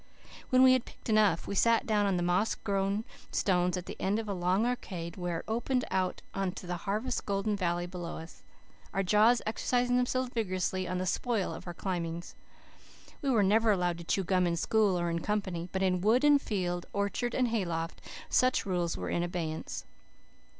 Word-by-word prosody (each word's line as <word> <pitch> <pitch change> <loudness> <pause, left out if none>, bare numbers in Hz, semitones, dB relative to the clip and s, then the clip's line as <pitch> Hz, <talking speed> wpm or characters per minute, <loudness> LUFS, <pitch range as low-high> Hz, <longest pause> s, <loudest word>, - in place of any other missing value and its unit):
When 255 0 +5
we 260 0 +8
had 255 -2 +2
picked - - -11
enough, 210 -6 +3
we - - -4
sat 230 +3 +3
down 210 -2 +2
on 190 -2 +1
the 175 - 0
moss 180 +5 +1
grown 200 +2 -1 0.3
stones 180 -1 +1
at 180 - -5
the - - -7
end 200 +2 +1
of 225 -1 -3
a 200 - -1
long 185 +4 +1
arcade, 180 -9 -3
where 175 -2 -2
it - - -25
opened 240 +3 0
out 185 -1 -1
on 195 -2 -1
the 180 -1 -4
harvest 210 +8 -2
golden 200 +1 0
valley 175 -2 -1
below 175 -1 -6
us, 165 +1 -11 0.5
our 195 - +2
jaws 215 +5 +4
exercising 245 +2 +1
themselves 250 0 0
vigorously 185 -4 -1
on 180 - -2
the 185 - -1
spoil 215 +1 0
of - - -9
our 175 - -5
climbings. 170 -2 -4 0.9
We 280 - -1
were 225 -6 +4
never 220 +3 +3
allowed 180 -4 +1
to - - -7
chew 195 +3 0
gum 185 0 +2
in 170 - 0
school 200 +1 +2
or 175 - 0
in 170 - -1
company, 185 -3 -2
but 190 0 -1
in 180 -1 +1
wood 225 +7 +3
and 290 -1 +6
field, 175 -6 -2
orchard 200 +4 -1
and 250 -2 +2
hayloft, 170 -7 -2 0.3
such 255 +1 +2
rules 175 -3 -1
were - - -4
in 170 - +1
abeyance. 170 -2 -4
195 Hz, 195 wpm, -30 LUFS, 175-220 Hz, 0.9 s, we